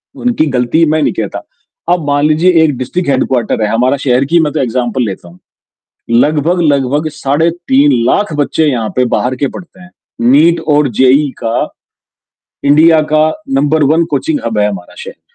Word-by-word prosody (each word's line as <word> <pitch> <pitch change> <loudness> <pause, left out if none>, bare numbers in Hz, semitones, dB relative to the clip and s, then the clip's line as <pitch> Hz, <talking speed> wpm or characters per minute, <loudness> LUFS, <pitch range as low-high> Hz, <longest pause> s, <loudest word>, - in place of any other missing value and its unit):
उनकी 240 -10 0
गलती 125 +7 +2
मैं 155 +1 0
नहीं - - 0
कहता। - - -4 0.5
अब 175 -4 -3
मान 145 +1 +1
लीजिए 160 +4 +2
एक 145 -5 0
डिस्ट्रिक्ट 160 +7 -3
हेडक्वार्टर 130 -4 0
है, - - +1
हमारा 125 +4 +1
शहर 130 +1 +2
की 170 +4 +2
मैं 150 -1 -2
तो 155 - -2
एग्ज़ाम्पल 125 0 -1
लेता 95 -4 -7
हूँ। 90 +1 -19 0.7
लगभग-लगभग 150 +1 +1
साढ़े 145 +3 0 0.2
3 140 +2 +4 0.2
लाख 205 -4 0
बच्चे 155 +2 0
यहाँ 115 -4 -2
पे 125 - +2
बाहर 130 +1 -2
के 140 +2 -1
पढ़ते 185 +1 -13
हैं। 185 - -15 0.4
नीट 160 +5 +4
और 145 -2 +2
जेईई 135 +3 +3
का 115 +1 -1 1.0
इंडिया 155 +3 +4
का 155 0 +3 0.2
नंबर 150 +3 +1
वन 170 +1 +2
कोचिंग 315 -3 -1
हब 110 -2 -2
है 105 0 +2
हमारा 95 -4 -8
शहर। 475 +1 -10
145 Hz, 170 wpm, -12 LUFS, 125-160 Hz, 1.0 s, 3